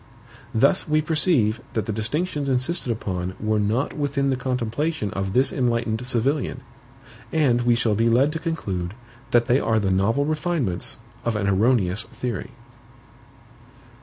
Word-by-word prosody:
Thus 140 +11 +3
we 155 0 +3
perceive 150 - +2
that 110 -3 -1
the 110 - -2
distinctions 145 - -2
insisted 130 +2 0
upon 95 -5 -3
were 110 0 +1
not 110 +7 0
within 140 -2 0
the - - +2
contemplation 125 - -2
of 95 0 -3
this 130 +4 +2
enlightened 115 -2 0
civilian; 130 +4 0 0.7
and 135 -7 +3
we 120 0 +3
shall 115 -2 +1
be 115 +3 +2
led 130 +6 +4
to 160 - -4
conclude, 100 - -3 0.3
that 120 -1 +4
they 125 +2 +3
are 110 -4 +1
the 100 -2 0
novel 110 +9 +2
refinements 155 - -1 0.3
of 115 -2 -1
an 105 -2 0
erroneous 100 -1 +2
theory. 120 0 -5
120 Hz, 145 wpm, -23 LUFS, 110-140 Hz, 0.7 s, led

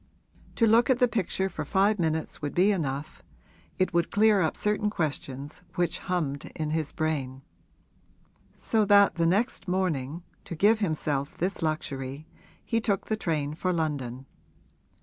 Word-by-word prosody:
To 230 - +3
look 230 +3 +4
at 260 - +4
the 250 -1 +4
picture 190 -4 -1
for - - -5
five 200 +2 +2
minutes 160 -1 -1
would 145 -1 -4
be 190 +4 +4
enough 145 -6 -3 0.6
it 185 - +1
would 170 0 +2
clear 210 -1 +4
up 160 - 0
certain 210 0 +1
questions 145 -5 -4
which 175 -2 0
hummed 150 -6 -2
in 155 -1 -2
his 155 -2 -1
brain; 140 -5 -2 1.1
so 220 -1 +1
that 200 0 +6
the 165 -1 +1
next 200 +2 0
morning, 170 -4 -1 0.2
to 170 - -6
give 210 +6 +4
himself 150 -7 -1
this 185 +3 -2
luxury, 145 -3 -3 0.4
he 230 -1 0
took 200 -3 0
the 220 - +2
train 155 -7 -2
for 185 +4 -1
London. 140 -7 -2
170 Hz, 150 wpm, -27 LUFS, 150-200 Hz, 1.1 s, that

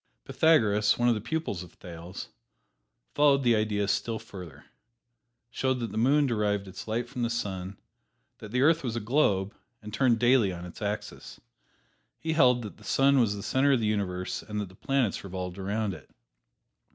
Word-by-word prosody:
Pythagoras, 105 -10 +3
one 120 0 +3
of - - +4
the 105 - -3
pupils 120 - -3
of 90 -2 -11
Thales, 85 +1 -9 0.8
following 140 -2 +4
the 120 -2 +4
idea 105 -2 0
still 110 +3 -1
further, 85 -10 -11 0.9
showed 130 0 0
that 115 -2 -4
the - - -5
moon 145 +5 +4
derived 105 -5 0
its 95 +3 -9
light 115 +2 -2
from 125 0 -6
the 115 - +1
sun; 95 -5 -4 0.6
that 110 - -9
the 125 +4 +1
earth 160 +2 +4
was 120 -3 -3
a - - -1
globe 105 -4 +1 0.3
and 105 -1 -10
turned 125 -1 +3
daily 120 -4 +4
on 90 -1 -7
its 90 - -11
axis. 105 +1 -5 0.8
He 160 0 -2
held 125 -6 +4
that 105 - -8
the 110 - -17
sun 135 +6 +3
was 110 -4 +2
the 100 - -7
center 140 +2 +2
of 130 - +3
the 110 - -1
universe 95 -4 -2
and 105 -1 -5
that 100 -3 -4
the 95 - -17
planets 135 -3 0
revolved 90 -1 -6
around 100 +1 -2
it. 80 -6 -12
110 Hz, 185 wpm, -28 LUFS, 100-125 Hz, 0.9 s, of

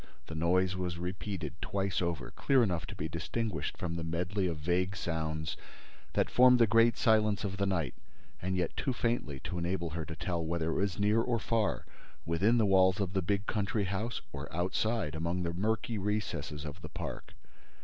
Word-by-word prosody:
The 80 - -8
noise 90 +3 +2
was 90 -2 -2
repeated 95 +2 -4
twice 100 -1 -1
over, 85 -6 -2
clearly 135 -3 +3
enough 90 -6 -1
to - - -7
be 80 - -3
distinguished 85 +6 -3
from 85 -2 -3
the 85 - -3
medley 90 +4 -1
of 85 -3 -2
vague 90 +5 0
sounds 80 -3 -2 0.6
that - - +2
formed 125 0 +6
the 115 - +6
great 115 +2 +4
silence 110 -2 +3
of 95 -2 -3
the 100 0 +1
night 85 -6 0 0.5
and 95 +1 -1
yet 90 -2 -1
too 130 - 0
faintly 115 - -1
to 90 - -4
enable 85 -1 -1
her 80 0 -3
to 80 - -6
tell 85 +1 -2
whether 80 0 -1
it - - -1
was 100 0 0
near 105 +2 +4
or 120 0 +1
far, 110 -1 0 0.4
within 100 +8 +3
the 110 - +4
walls 95 -1 +5
of 95 -2 -1
the 95 - +1
big 100 +3 0
country 105 0 0
house, 100 +5 -2
or 70 0 -6
outside, 90 +2 0
among 85 +3 -1
the 85 0 -1
murky 110 +3 -1
recesses 85 -8 -2
of 75 +3 -7
the 80 - -7
park. - - -6
95 Hz, 190 wpm, -32 LUFS, 85-105 Hz, 0.6 s, formed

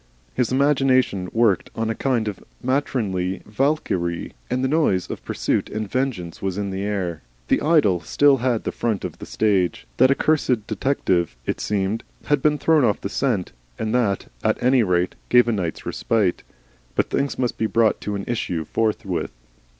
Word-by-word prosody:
His 125 -2 0
imagination 130 -8 +2
worked 115 -5 +2
on 115 0 -1
a - - 0
kind 120 -2 0
of 105 - -5 0.2
matronly 105 -9 -1
Valkyrie, 105 - -1 0.2
and 125 +1 0
the - - +3
noise 135 - +2
of - - -7
pursuit - - -1
and 110 0 -3
vengeance 110 -9 -2
was 95 -1 -2
in 100 -1 -2
the 95 0 -3
air. 95 -5 -2 0.3
The - - +3
idyll 145 - +3
still 140 - +3
had 120 -2 0
the - - -2
front 110 -5 -2
of - - -7
the - - -8
stage. 100 -5 +1
That 130 +1 +6
accursed 135 -6 +2
detective, 90 - 0
it - - -2
seemed, 105 +1 -1 0.2
had 145 -2 +2
been 150 +1 +3
thrown 155 0 +3
off 105 -5 +2
the 100 - -4
scent, 110 -5 -1 0.3
and 110 +1 -2
that, 110 -6 +1 0.2
at - - +2
any 130 0 +5
rate, 90 -3 +1 0.2
gave 125 -1 +6
a - - +2
night's 90 -7 -3
respite. 105 -6 0 0.5
But - - 0
things 140 0 0
must 125 -2 -1
be 110 - +2
brought 115 0 +2
to 105 - -3
an 100 - -4
issue 90 -9 -2
forthwith. 100 -6 -1
110 Hz, 175 wpm, -22 LUFS, 95-130 Hz, 0.5 s, That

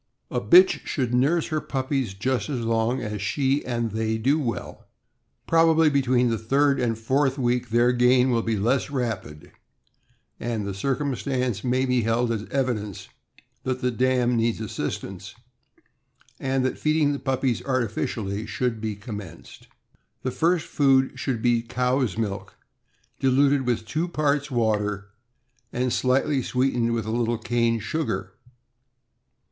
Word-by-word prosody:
A - - -1
bitch 370 +1 +6
should 125 -4 -1
nurse 145 +7 +2
her 155 -1 -1
puppies 130 -6 -2
just 130 +5 -1
as 130 -5 -2
long 115 +2 0
as 105 -1 -4
she 135 +6 0
and 120 -3 -2
they 110 +1 -1
do 135 +8 +2
well. 115 -10 -5 0.6
Probably 165 -1 +4
between 130 -3 +2
the 115 - -1
third 140 +4 +2
and 115 -3 0
fourth 135 +4 +1
week 125 -2 0
their 120 +2 +3
gain 125 +1 +4
will 115 -1 +2
be 115 -1 -1
less 120 +8 +1
rapid, 115 - -4 0.9
and 115 -3 -3
the 100 - -3
circumstance 130 -1 -2
may 130 +1 +1
be 125 -1 +2
held 115 +2 +1
as 110 -3 -3
evidence 115 -7 -2 0.5
that 130 0 -3
the 125 -1 +1
dam 125 0 +1
needs 115 -1 +1
assistance, 110 -2 -5 1.0
and 135 -1 0
that 130 - -2
feeding 155 -1 +2
the 140 - -4
puppies 130 -2 -1
artificially 110 -4 -2
should 115 +1 -2
be 110 -2 -3
commenced.' 100 -4 -9 0.6
The 130 - -1
first 165 +3 +1
food 135 -2 +2
should 125 -4 -2
be 120 -1 +3
cow's 125 -2 0
milk, 100 -3 -4 0.6
diluted 135 0 +3
with 120 -2 0
two 155 +9 -2
parts 150 -3 0
water, 105 -4 -1 0.6
and 125 0 -1
slightly 135 +2 +1
sweetened 125 -2 0
with 115 -2 -2
a 110 - -3
little 120 0 0
cane 115 0 0
sugar. 155 +9 -3
125 Hz, 140 wpm, -25 LUFS, 115-135 Hz, 1.0 s, bitch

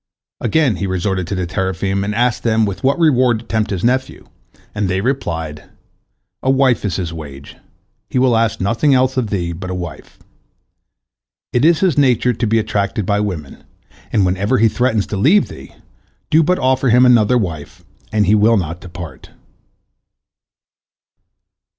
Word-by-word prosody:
Again 145 - +1
he 95 - -3
resorted 95 -1 -2
to 100 - -3
the 90 -1 -2
teraphim, 95 +1 -2
and 105 +1 -3
asked 120 +1 +1
them 110 -1 +2
with 100 -2 -5
what 135 +4 +2
reward 130 -8 +3
to 110 - -11
tempt 110 -1 -1
his 95 -3 -3
nephew, 130 +2 -1 0.5
and 105 -1 -1
they 95 +1 0
replied: 80 - -3 0.8
"A 130 - -1
wife 135 -2 +2
is 100 -4 -2
his 85 -4 -4
wage; 70 -3 -10 0.5
he - - -2
will 125 -2 +3
ask 115 0 0
nothing 115 +8 +2
else 130 +1 +2
of 125 -5 -1
thee 90 -4 -2
but 95 +2 -7
a 90 - -3
wife. 85 -4 -8 1.4
It 120 - +2
is 165 0 +4
his 175 -7 +2
nature 125 -2 +3
to 115 +1 -2
be 115 +2 +2
attracted 105 -2 -1
by 100 +1 +1
women, 90 -9 -5 0.5
and 100 -3 +2
whenever 95 +7 0
he 115 0 +4
threatens 115 -3 0
to 105 - -5
leave 165 - +3
thee, 65 0 -12 0.6
do 160 - +5
but 180 +4 +1
offer 130 0 +1
him 125 +2 +5
another 125 -1 +4
wife, 85 -10 -5 0.3
and 105 -1 +2
he 100 - +3
will 110 +2 +4
not 85 -1 -4
depart." 85 -6 -10
105 Hz, 170 wpm, -17 LUFS, 95-125 Hz, 1.4 s, do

